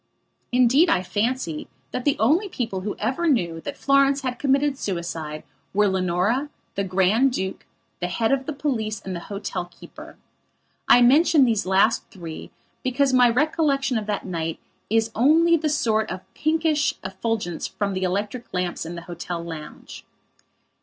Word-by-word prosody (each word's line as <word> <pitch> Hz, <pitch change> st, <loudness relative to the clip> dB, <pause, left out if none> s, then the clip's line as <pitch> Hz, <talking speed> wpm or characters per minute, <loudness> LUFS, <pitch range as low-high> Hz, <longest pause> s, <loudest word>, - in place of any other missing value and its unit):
Indeed, 255 Hz, +7 st, +4 dB
I 185 Hz, -, +2 dB
fancy 205 Hz, -5 st, -2 dB, 0.2 s
that 250 Hz, -, -4 dB
the 285 Hz, -, +2 dB
only 320 Hz, -, +2 dB
people 225 Hz, -, -3 dB
who 205 Hz, +2 st, -4 dB
ever 260 Hz, +11 st, -1 dB
knew 170 Hz, -, 0 dB
that 285 Hz, -, -6 dB
Florence 275 Hz, 0 st, +3 dB
had 255 Hz, -2 st, -3 dB
committed 280 Hz, +1 st, +2 dB
suicide 165 Hz, -5 st, -4 dB, 0.3 s
were 210 Hz, 0 st, +4 dB
Leonora, 190 Hz, +9 st, 0 dB, 0.2 s
the 200 Hz, -, -1 dB
Grand 195 Hz, +8 st, +3 dB
Duke, 190 Hz, -5 st, -4 dB, 0.3 s
the 180 Hz, -, -1 dB
head 225 Hz, +6 st, 0 dB
of 270 Hz, -1 st, 0 dB
the 310 Hz, -, -2 dB
police 225 Hz, -7 st, -2 dB
and 190 Hz, -1 st, -6 dB
the -, -, -4 dB
hotel 195 Hz, -3 st, -4 dB
keeper. 175 Hz, -, -13 dB, 0.7 s
I 245 Hz, -, +7 dB
mention 290 Hz, +3 st, +5 dB
these 225 Hz, -5 st, 0 dB
last 195 Hz, +4 st, +3 dB
three 170 Hz, -5 st, -8 dB, 0.3 s
because 265 Hz, 0 st, +1 dB
my 250 Hz, -1 st, +6 dB
recollection 275 Hz, 0 st, +1 dB
of 215 Hz, -2 st, -2 dB
that 210 Hz, -2 st, -2 dB
night 165 Hz, -3 st, -3 dB, 0.3 s
is 225 Hz, +1 st, +1 dB
only 320 Hz, +8 st, +4 dB
the 310 Hz, -1 st, 0 dB
sort 225 Hz, -8 st, +1 dB
of 185 Hz, 0 st, -5 dB
pinkish 310 Hz, -1 st, +1 dB
effulgence 190 Hz, -2 st, -3 dB
from 200 Hz, -1 st, -3 dB
the 185 Hz, -, -3 dB
electric 200 Hz, +6 st, -2 dB
lamps 180 Hz, -2 st, -2 dB
in 170 Hz, -, -6 dB
the 170 Hz, -, -7 dB
hotel 175 Hz, 0 st, -5 dB
lounge. 160 Hz, -3 st, -9 dB
225 Hz, 160 wpm, -23 LUFS, 185-275 Hz, 0.7 s, I